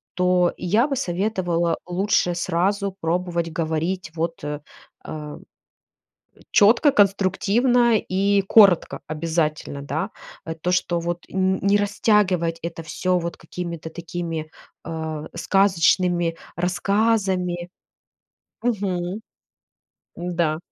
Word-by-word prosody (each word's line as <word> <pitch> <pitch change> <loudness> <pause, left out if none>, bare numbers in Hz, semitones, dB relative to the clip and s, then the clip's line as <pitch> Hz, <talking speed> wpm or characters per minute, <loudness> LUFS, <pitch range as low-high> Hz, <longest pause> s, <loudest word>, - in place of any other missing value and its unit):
То 180 -1 +3
я 210 +9 +2
бы 280 - -1
советовала 175 -4 0
лучше 180 0 +1
сразу 190 +3 0
пробовать 170 0 -1
говорить 165 +2 -2
вот, 165 -1 -3
э, 150 0 -4 1.9
чётко, 235 +8 +5
конструктивно 210 +4 +3
и 200 0 +1
коротко 195 -6 +5
обязательно, 155 -2 -2
да. 155 +8 -2 0.4
Э, 160 - -4
то, 170 +2 -2
что 180 -1 +1
вот, 170 +1 -3
н 190 0 +1
не 200 +1 +3
растягивать 200 -5 +2
это 170 0 -5
всё 180 +3 -1
вот 170 0 -5
какими-то 170 -2 -6
такими, 165 -2 -5 0.4
э, 160 -2 -4
сказочными 175 -2 +2 0.2
рассказами 185 -1 0 0.9
Мгм. 195 -4 -1 1.0
М-да, 170 -3 -1
180 Hz, 95 wpm, -23 LUFS, 165-200 Hz, 1.9 s, чётко